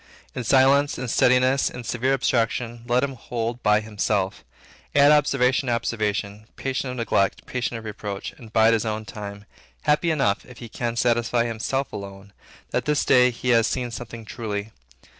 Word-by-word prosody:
In 125 - -4
silence, 135 +3 +4
in 130 - -4
steadiness, 130 +3 +3
in 125 - -8
severe 125 +3 0
abstraction, 120 -2 -1
let 125 +1 +2
him 140 -1 -1
hold 120 -1 -4
by 105 0 +3
himself; 105 -2 -1 0.5
add 145 +1 +7
observation 135 -3 +3
to 120 - +2
observation, 105 -2 -2
patient 135 0 -3
of 125 - -5
neglect, 105 -4 0
patient 125 -2 -3
of 115 - -9
reproach; 105 -2 -5
and 115 -3 -14
bide 110 0 +5
his 110 - +1
own 110 -1 -3
time, 100 -1 -8 0.4
happy 150 +3 +2
enough, 135 -11 +1
if 125 - -14
he 120 -2 -9
can 120 +1 -3
satisfy 120 0 +1
himself 120 +4 -2
alone, 100 0 -9 0.4
that - - -1
this 150 -1 +1
day 125 -1 +5
he 125 +1 -4
has 115 -2 +4
seen 125 -2 -2
something 115 -1 -8
truly. 110 -2 -5
120 Hz, 170 wpm, -24 LUFS, 110-130 Hz, 0.5 s, add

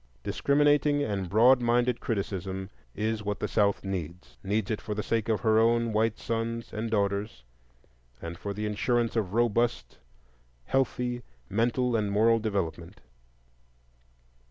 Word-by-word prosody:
Discriminating 145 0 +2
and 100 -5 -2
broad 120 +6 +5
minded 120 0 +2
criticism 95 -3 -3 0.2
is 110 0 -1
what 105 -1 -3
the - - -1
South 100 -1 +1
needs,—needs 95 +4 -4
it 110 - -2
for 105 - -4
the 105 - -2
sake 115 -1 -1
of 110 -4 +1
her 110 +1 +4
own 115 0 +2
white 110 +1 +1
sons 115 +1 -3
and 110 +2 -3
daughters, 100 - -1 0.8
and 85 +1 -6
for 100 +4 -5
the 105 +2 -4
insurance 115 +3 0
of 105 -3 -1
robust, 120 0 0 0.7
healthy 125 -2 0 0.3
mental 120 +3 +1
and 105 -2 0
moral 115 +3 +4
development. 95 -6 -3
110 Hz, 130 wpm, -28 LUFS, 100-120 Hz, 0.8 s, broad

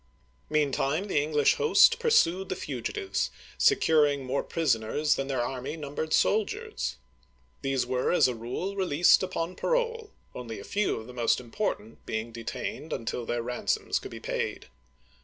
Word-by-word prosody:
Meantime, 150 +3 +1
the 170 -8 +1
English 150 -1 +2
host 465 +1 +5
pursued 190 - +3
the - - -1
fugitives, 120 - -3 0.3
securing 145 -4 +4
more 130 +2 0
prisoners 150 -1 +1
than 135 - -2
their 130 -3 0
army 130 +5 -4
numbered 150 +1 -4
sol 215 +6 +4
diers. 65 - -5 0.7
These 135 -2 0
were, 125 0 0
as 175 - +5
a 125 - -1
rule, 125 - -4
released 175 -4 +4
upon 185 -1 -3
parole, 465 -3 -1 0.2
only 115 -3 -6
a - - -8
few 205 0 0
of 110 - -9
the 125 - -11
most 120 -2 +2
important 120 - -4
being 110 +1 -3
detained 115 +6 -5
until 115 +1 -3
their 120 -1 -1
ran 125 +1 -5
soms - - +1
could - - -8
be - - -8
paid. - - -3
140 Hz, 160 wpm, -28 LUFS, 120-180 Hz, 0.7 s, host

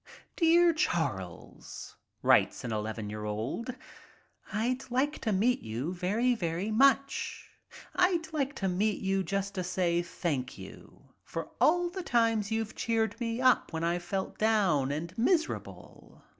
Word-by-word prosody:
"Dear 340 0 +5
Charles," 110 - -3 0.3
writes - - +4
an 120 - -4
11 110 0 -3
year 105 0 -5
old, 115 - -3 0.8
"I'd 250 +5 -1
like 265 +5 0
to 220 - 0
meet 220 +6 +2
you 120 +10 -4
very, 205 +8 +1
very 180 0 -2
much. 275 +4 +2 0.4
I'd 345 -3 +2
like 285 -2 -1
to 195 - -1
meet 200 +3 0
you 195 0 +1
just 200 +1 -2
to 185 -2 -2
say 175 -1 +1
thank 145 -7 -3
you - - -13
for - - -5
all 350 +2 +4
the 375 +1 -4
times 230 - +1
you've 225 -1 -2
cheered 225 0 -1
me 230 +1 -2
up 255 -1 +4
when 160 0 -2
I've 170 +1 0
felt 190 +2 -4
down 195 -11 +2
and 165 +5 -4
miserable. 325 +6 -2
210 Hz, 145 wpm, -30 LUFS, 170-255 Hz, 0.8 s, Dear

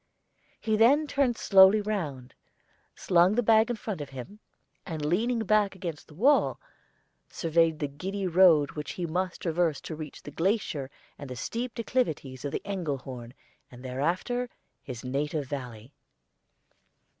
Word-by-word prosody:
He 220 -1 0
then 265 +8 +5
turned 275 -5 +1
slowly 195 +1 +6
round, 160 -12 -4 0.6
slung 180 +3 +3
his 245 -1 +1
bag 220 +1 +5
in 240 - 0
front 210 -6 -5
of 145 - -6
him, 135 - -9 0.4
and 160 -4 -5
leaning 225 +8 +1
back 210 -1 +2
against 170 -5 -6
the 150 - -16
wall, 270 - +3 0.7
surveyed 165 -1 +1
the 150 - -2
giddy 190 +8 -4
road 170 -5 +5
which 150 -2 -6
he 180 - -3
must 180 +2 -3
traverse 165 -3 +1
to 160 - -6
reach 155 -1 -9
the 145 - -8
glacier 165 - -1 0.3
and 140 - -8
the 125 - -6
steep 235 - -4
declivities 160 - -2
of 145 - -3
the - - -3
Engelhorn, 135 -10 -5 0.3
and 125 +1 -13
thereafter 180 - -1 0.3
his 125 -2 -8
native 145 +3 -2
valley. 125 -3 -7
170 Hz, 145 wpm, -28 LUFS, 145-215 Hz, 0.7 s, slowly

